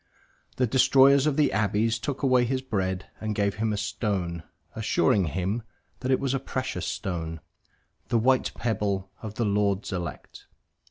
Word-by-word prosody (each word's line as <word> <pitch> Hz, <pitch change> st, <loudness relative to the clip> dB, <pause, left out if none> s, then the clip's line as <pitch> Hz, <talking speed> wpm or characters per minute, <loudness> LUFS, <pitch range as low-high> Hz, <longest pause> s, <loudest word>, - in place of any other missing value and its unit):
The 125 Hz, -, +2 dB
destroyers 135 Hz, +3 st, +5 dB
of 145 Hz, -, +1 dB
the 150 Hz, -2 st, +3 dB
abbeys 110 Hz, +2 st, +1 dB
took 140 Hz, +4 st, -4 dB
away 130 Hz, -2 st, +4 dB
his 130 Hz, +2 st, -1 dB
bread 95 Hz, -6 st, -2 dB
and 110 Hz, -1 st, -3 dB
gave 100 Hz, 0 st, 0 dB
him 110 Hz, 0 st, 0 dB
a 105 Hz, -, -1 dB
stone, 95 Hz, -5 st, -2 dB, 0.3 s
assuring 110 Hz, -1 st, +2 dB
him 95 Hz, +7 st, -2 dB, 0.4 s
that 130 Hz, -, -3 dB
it 130 Hz, -, +3 dB
was 135 Hz, -1 st, -1 dB
a 135 Hz, -, 0 dB
precious 130 Hz, 0 st, -3 dB
stone, 80 Hz, -4 st, -3 dB, 0.7 s
the 120 Hz, -, +2 dB
white 130 Hz, +3 st, +2 dB
pebble 100 Hz, -5 st, -1 dB
of 110 Hz, -1 st, -7 dB
the 115 Hz, -, 0 dB
Lord's 100 Hz, -1 st, 0 dB
elect. 90 Hz, -2 st, -6 dB
110 Hz, 160 wpm, -26 LUFS, 100-130 Hz, 0.7 s, destroyers